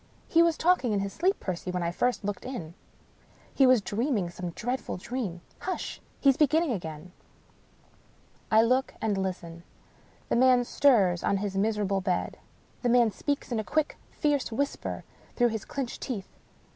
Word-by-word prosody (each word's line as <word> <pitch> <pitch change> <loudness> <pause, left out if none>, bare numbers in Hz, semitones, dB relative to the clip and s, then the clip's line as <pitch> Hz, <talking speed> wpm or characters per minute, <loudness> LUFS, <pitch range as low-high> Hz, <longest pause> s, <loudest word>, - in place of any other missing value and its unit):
" - - -32
He 335 - +8
was 335 -1 +3
talking 325 -10 +3
in 200 - +1
his 195 0 -4
sleep, 375 +4 +1
Percy, 185 -1 -4
when 180 -1 -1
I 170 - 0
first 245 +5 0
looked 205 0 -3
in. 180 -11 -6 0.8
He 270 - +5
was 255 -5 +5
dreaming 210 -3 -1
some 180 0 -5
dreadful 245 +7 -3
dream. 190 -4 -4 0.2
Hush! 375 - -4 0.2
he's 275 -2 +4
beginning 310 +1 +3
again." 165 -4 -5 1.4
I 220 +1 +6
look 255 +3 +1
and 215 -2 0
listen. 180 -3 -4 0.7
The - - +2
man 250 0 +5
stirs 210 -10 +3
on 200 - +2
his 195 0 -3
miserable 200 -1 +1
bed. 185 -1 -1 0.4
The 245 - +1
man 240 -2 +5
speaks 285 +7 -3
in 235 - 0
a - - -1
quick, 310 +5 0
fierce 290 -5 0
whisper 280 +5 -2 0.3
through 245 -1 +3
his 220 -2 -4
clinched 270 -4 -4
teeth. 215 -8 -5
225 Hz, 165 wpm, -28 LUFS, 190-265 Hz, 1.4 s, He